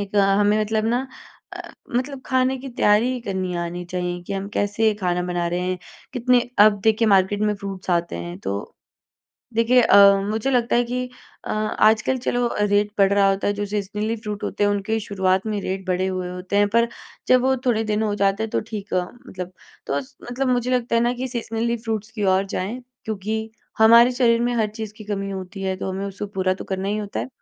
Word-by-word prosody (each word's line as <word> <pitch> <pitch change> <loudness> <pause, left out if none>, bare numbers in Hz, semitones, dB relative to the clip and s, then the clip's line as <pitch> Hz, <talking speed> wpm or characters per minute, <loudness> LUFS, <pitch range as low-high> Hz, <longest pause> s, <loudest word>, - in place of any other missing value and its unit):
एक 200 0 -4
अ, - - +6 0.2
हमें 210 +1 +3
मतलब 215 0 0
ना 245 +3 0 0.5
अ, - - -8 0.3
मतलब 260 +1 -3
ख़ाने 260 0 +2
की 270 +1 -8
तैयारी 240 +1 +2
करनी 190 -4 -3
आनी 175 +1 -6
चाहिए 180 0 -3
कि 175 - -6
हम 195 0 -3
कैसे 215 +2 +2
ख़ाना 180 -1 0
बना 175 -1 -2
रहे 175 +1 -1
हैं 180 0 -2 0.3
कितने 250 0 +2
अब 205 -1 +6
देखिए 220 0 +3
मार्केट 195 0 +3
में 210 0 +1
फ़्रूट्स 195 -2 -6
आते 170 - 0
हैं 85 +1 -6
तो 100 0 -3 1.0
देखिए 230 +3 +4
अ, - - +5 0.3
मुझे 220 +5 -1
लगता 245 -2 +2
है 240 - +3
कि 250 +1 -2 0.4
अ, - - -5
आजकल 215 +3 +2
चलो 245 -1 0
रेट 205 0 +2
बढ़ 195 0 +4
रहा 200 -1 +4
होता 195 0 -1
है - - +2
जो 205 0 -3
सीज़नली 210 +2 -2
फ़्रूट 210 -2 -6
होते 205 - -1
हैं 205 - +3
उनके 205 +2 -1
शुरुआत 190 -1 0
में 210 -2 -1
रेट 190 0 -4
बढ़े 185 +1 +1
हुए 185 -1 -3
होते 180 +2 -4
हैं 205 0 +4
पर 235 +3 +2 0.4
जब 255 -1 +5
वो 265 +1 +2
थोड़े 225 -3 +2
दिन 210 +1 +1
हो 210 -2 0
जाते 200 +1 +1
हैं 220 - -6
तो - - 0
ठीक 210 -2 -5
अ, 180 - +2 0.3
मतलब। 180 -1 -7 0.4
तो 140 - 0
मतलब 240 - -5
मुझे 250 0 +1
लगता 245 -2 +1
है 230 - +3
ना 240 +1 +2
कि 260 - -2
सीज़नली 235 -1 -2
फ़्रूट्स 220 -2 -4
की 215 -2 -3
ओर 190 - +1
जाएँ 220 +8 -3 0.2
क्योंकि 220 +1 -3 0.3
हमारे 230 +2 +7
शरीर 235 -2 +3
में 245 0 +1
हर 220 -2 +2
चीज़ 220 -2 -5
की 215 - -9
कमी 195 -1 -3
होती 190 0 -6
है 190 -1 -1
तो 190 - -4
हमें 190 +1 -3
उसको 200 +1 -5
पूरा 185 -1 +1
तो - - -8
करना 190 0 -3
ही 205 - 0
होता 205 -1 -4
है। - - -5
210 Hz, 215 wpm, -22 LUFS, 190-230 Hz, 1.0 s, हमारे